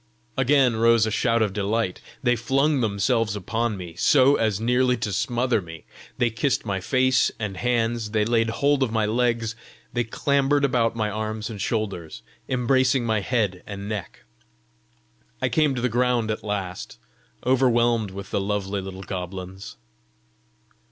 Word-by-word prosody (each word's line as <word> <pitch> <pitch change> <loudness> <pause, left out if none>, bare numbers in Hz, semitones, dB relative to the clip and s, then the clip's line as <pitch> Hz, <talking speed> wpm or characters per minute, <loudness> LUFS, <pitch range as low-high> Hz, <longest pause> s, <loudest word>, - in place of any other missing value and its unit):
Again 135 -3 +3
rose 115 -1 +4
a 110 - -2
shout 115 +1 +2
of 105 -3 -1
delight; 105 -1 -1 0.2
they 120 -1 +3
flung 135 +5 +1
themselves 105 0 +1
upon 110 +2 -2
me, 90 -3 -8
so 130 - +4
as 110 -3 0
nearly 125 +2 +2
to 110 -3 -3
smother 120 +3 0
me; 80 -2 -11 0.3
they 120 -1 +1
kissed 125 +3 0
my 100 -3 -1
face 130 +4 +2
and 105 -4 -4
hands; 115 -1 0
they 105 0 +1
laid 115 0 +2
hold 140 +4 +1
of 130 -4 +1
my 110 -1 +1
legs; 115 0 0 0.4
they 120 0 +1
clambered 140 +4 +1
about 120 -4 +1
my 110 -2 -1
arms 110 +1 -4
and 105 -3 -7
shoulders, 100 -7 -3 0.3
embracing 130 0 +2
my 110 -1 +1
head 100 -4 -1
and 100 -1 -6
neck. 105 -6 -6 1.2
I - - 0
came 150 -4 +2
to 120 - -3
the 125 - +2
ground 120 -2 +1
at 110 - -4
last, 95 -3 -4 0.5
overwhelmed 120 -4 +3
with 100 +1 -9
the - - 0
lovely 100 0 -2
little 95 0 -8
goblins. 95 +1 -7
115 Hz, 155 wpm, -24 LUFS, 100-125 Hz, 1.2 s, rose